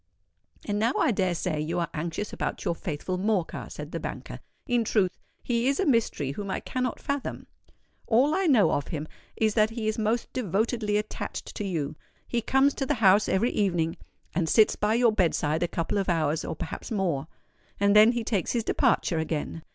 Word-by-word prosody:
"And 205 -1 -1
now 230 +4 +2
I - - +3
dare 185 -4 0
say 165 -3 -2
you 160 +3 -2
are 170 - -2
anxious 170 +6 -4
about - - -3
your - - +1
faithful 170 +2 -4
Morcar," 195 -4 -1
said - - -7
the - - -3
banker. - - -6 0.3
"In 245 -4 +2
truth, 200 -4 +1 0.3
he 235 0 0
is 275 0 +1
a 390 - +2
mystery 230 - +1
whom 200 +7 -5
I - - -1
cannot 255 -1 -3
fathom. 280 -1 -3 0.6
All 260 +7 +4
I 380 +1 +1
know 220 - +5
of 145 - -1
him 155 -1 -4 0.3
is 220 -1 +1
that 215 -1 +3
he 225 -1 -4
is 215 +1 -1
most 220 +2 -1
devotedly 215 -1 0
attached 210 0 -5
to - - -4
you. 155 -6 -2 0.3
He 240 - 0
comes 270 +4 +3
to 270 - -1
the - - +1
house 205 -2 +4
every 225 +6 +2
evening, 175 -5 0 0.4
and 165 -1 0
sits 215 +5 +5
by 210 +2 +1
your 240 -1 +4
bed 190 -6 +2
side 155 +2 0
a 175 - +2
couple 170 +4 -1
of 195 - -1
hours, 160 -2 +1
or - - -4
perhaps - - -6
more; 175 -10 -1 0.5
and 200 +1 +3
then 215 +3 +8
he 240 -1 -2
takes 205 -6 -1
his 235 -2 0
departure 165 -5 +1
again. 160 +1 -3
205 Hz, 200 wpm, -27 LUFS, 170-230 Hz, 0.6 s, then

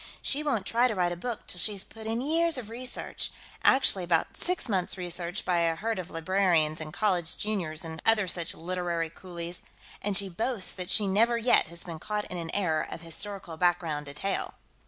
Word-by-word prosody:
She 285 - +1
won't 275 -10 0
try 240 +2 +3
to 220 - -2
write 175 -2 +2
a - - -2
book 235 +6 -5
till 180 - -2
she's 200 +1 +2
put 220 0 -10
in 225 +2 0
years 325 +3 +2
of 225 -3 -6
research 250 +2 -2 0.3
actually, 230 -8 +5
about 170 -2 +1
six 360 -4 0
months' 190 -4 0
research 175 +1 -2
by 175 -1 +2
a 165 -1 +2
herd 220 +3 -1
of 180 -1 -5
librarians 165 -2 +2
and 155 -1 -6
college 180 -4 +1
juniors 175 -7 -1
and 160 0 -6
other 220 -3 +4
such 170 -1 +1
literary 170 -1 -2
coolies 175 -1 -6 0.4
and 200 -2 +2
she 200 -1 +2
boasts 215 +2 -2
that 180 -2 -5
she 210 - +4
never 225 +5 +3
yet 235 +1 +4
has 170 +1 -5
been 165 -3 -7
caught 210 +3 -2
in 180 - -3
an 165 -1 -4
error 165 -6 +1
of - - -7
historical 170 0 -4
background 165 -4 +1
detail. 150 +8 -3
185 Hz, 200 wpm, -29 LUFS, 170-215 Hz, 0.4 s, actually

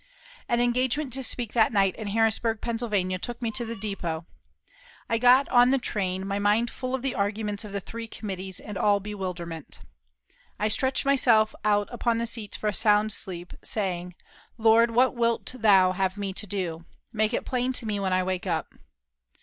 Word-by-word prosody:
An 235 - +2
engagement 250 +3 +1
to 265 - 0
speak 240 -3 0
that 225 -2 +4
night 195 -4 +2
in 220 - -6
Harrisburg, 225 +1 +1
Pennsylvania, 210 -6 -1
took 240 +5 -5
me 230 -2 -2
to 240 - -1
the 230 +1 -5
depot. 180 -6 -4 0.8
I 230 - 0
got 250 +3 +6
on 245 0 +6
the 270 - +3
train, 190 -6 -2
my 200 0 -2
mind 210 +4 +2
full 255 0 -3
of 260 - -6
the 270 - -1
arguments 205 +1 -2
of 210 - -9
the 200 0 -3
three 230 +4 -7
committees, 190 -4 -6
and 205 -3 -7
all 205 +1 +4
a - - -5
bewilderment. 180 -6 -6 0.8
I 215 - 0
stretched 260 +5 0
myself 240 -6 +4
out 205 -1 +2
upon 235 -1 0
the 230 - -1
seats 225 -3 -2
for - - -8
a 210 - +1
sound 210 0 +3
sleep, 175 -3 -3
saying, 180 -4 -2 0.4
"Lord, 230 +1 +5
what 250 +3 +3
wilt 235 0 0
Thou 195 -4 +5
have 190 +1 -1
me 200 -2 -3
to 210 - -5
do? 175 -4 -3 0.3
Make 215 0 +1
it - - -3
plain 250 0 0
to 250 - -3
me 210 -2 -2
when 190 -1 -1
I 185 0 +2
wake 185 0 -3
up." 165 -3 -2
215 Hz, 190 wpm, -26 LUFS, 195-235 Hz, 0.8 s, got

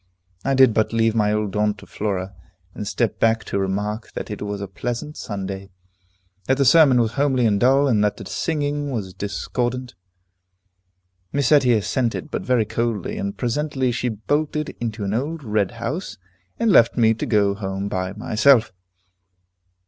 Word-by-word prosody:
I 135 - +1
did 130 -3 +6
but 110 +1 +1
leave 115 -1 +2
my 105 -2 +2
old 105 -2 -1
aunt 105 0 +1
to - - -13
Flora, 100 -2 -3 0.4
and 105 - -6
step 120 +1 -1
back 115 0 +2
to 100 - -2
remark 105 +3 -3
that - - -6
it 105 - -6
was 105 0 -4
a 100 - -5
pleasant 120 +9 -5
Sunday, 95 -1 -5 0.8
that 135 - +2
the 140 - +2
sermon 135 -2 +6
was 115 -2 +1
homely 135 -2 +1
and 105 -2 +2
dull, 135 +5 +4
and 110 -5 +2
that 105 - 0
the - - -9
singing 145 -2 -2
was 105 -8 -4
discordant. 120 +6 -3 1.4
Miss 140 +1 +1
Etty 135 -5 +5
assented, 115 +6 -1
but - - -2
very 125 -4 +1
coldly, 115 - -2
and 200 0 -4
presently 130 +1 -1
she 125 +1 -1
bolted 145 +7 -1
into 115 -2 -3
an 100 0 -2
old 150 +7 -2
red 105 -4 0
house, 120 - -4 0.4
and 230 -2 +2
left 115 -11 +5
me 115 -2 +4
to 115 - -4
go 105 -3 +3
home 95 -1 -4
by 95 -1 -3
myself. 110 +2 +3
115 Hz, 170 wpm, -22 LUFS, 105-135 Hz, 1.4 s, did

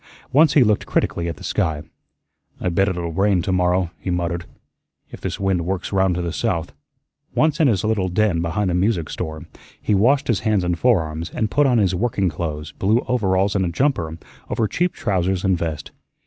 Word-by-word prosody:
Once 150 +2 +5
he 140 - +7
looked 105 -3 +1
critically 85 0 0
at 85 - -4
the - - -12
sky. 75 -2 -1 0.8
"I - - -1
bet 95 +3 +2
it'll 85 -2 -3
rain 95 0 +2
to 95 - -1
morrow," 90 -1 +1
he - - -5
muttered, 85 -1 -2 0.7
"if - - -10
this - - -4
wind 95 -3 +1
works 95 +2 -3
round 95 -2 +2
to 90 - -2
the 85 -1 -3
south." 90 -8 -2 0.6
Once 155 -1 +2
in 155 - +5
his 105 -7 +1
little 105 -4 0
den 90 -2 +1
behind 90 +3 -1
the - - -1
music 90 -3 0
store, 80 -1 -5 0.3
he - - 0
washed 135 +8 +3
his 115 -5 +1
hands 105 -4 +1
and 90 -1 -1
forearms, 85 -8 +1
and 110 -3 -2
put 145 -1 +3
on 125 -2 +3
his 100 -4 +2
working 100 -1 0
clothes, 75 -3 -5
blue 110 +9 +1
overalls 100 -4 +1
and 95 - +2
a 90 - 0
jumper, 85 - 0 0.3
over 110 - 0
cheap 175 - 0
trousers 95 -3 0
and 95 -3 +2
vest. 80 -4 -4
95 Hz, 200 wpm, -21 LUFS, 85-110 Hz, 0.8 s, he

